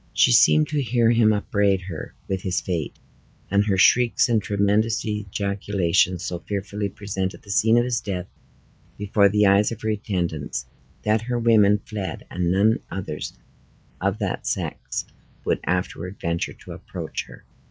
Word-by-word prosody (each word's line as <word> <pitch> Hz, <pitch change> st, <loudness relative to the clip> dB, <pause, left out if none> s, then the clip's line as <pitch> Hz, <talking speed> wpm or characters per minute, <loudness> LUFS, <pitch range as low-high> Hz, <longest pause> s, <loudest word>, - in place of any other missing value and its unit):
She -, -, +4 dB
seemed 75 Hz, +4 st, +5 dB
to 150 Hz, -, 0 dB
hear 120 Hz, -2 st, +2 dB
him 115 Hz, -2 st, +4 dB
upbraid 100 Hz, -2 st, +1 dB
her 90 Hz, -4 st, -7 dB
with 95 Hz, -1 st, -2 dB
his 90 Hz, -1 st, -1 dB
fate: 85 Hz, -5 st, -3 dB, 0.5 s
and 100 Hz, +1 st, +4 dB
her 95 Hz, -2 st, +2 dB
shrieks 120 Hz, +5 st, +4 dB
and 115 Hz, -2 st, +3 dB
tremendous 105 Hz, +2 st, +1 dB
ejaculations 100 Hz, -3 st, 0 dB
so 90 Hz, -5 st, -3 dB
fearfully 100 Hz, +2 st, -3 dB
presented 95 Hz, -1 st, -4 dB
the 100 Hz, -, -8 dB
scene 110 Hz, +3 st, +4 dB
of 120 Hz, -, +4 dB
his 120 Hz, -1 st, -1 dB
death 95 Hz, -3 st, -4 dB, 0.7 s
before 100 Hz, 0 st, +3 dB
the 105 Hz, +1 st, +3 dB
eyes 100 Hz, +2 st, +4 dB
of 115 Hz, -, -7 dB
her 110 Hz, -, 0 dB
attendants, 90 Hz, -8 st, -2 dB, 0.4 s
that 105 Hz, +1 st, +2 dB
her 120 Hz, +1 st, -2 dB
women 110 Hz, -3 st, +5 dB
fled 95 Hz, -6 st, -5 dB
and 90 Hz, -1 st, 0 dB
none 105 Hz, +4 st, +3 dB
others 90 Hz, -5 st, -5 dB, 0.6 s
of 100 Hz, +2 st, 0 dB
that 100 Hz, -4 st, -3 dB
sex -, -, -3 dB, 0.4 s
would -, -, +1 dB
afterward 90 Hz, +1 st, -2 dB
venture 85 Hz, 0 st, -2 dB
to -, -, -13 dB
approach -, -, -6 dB
her. -, -, -14 dB
100 Hz, 155 wpm, -23 LUFS, 90-110 Hz, 0.7 s, seemed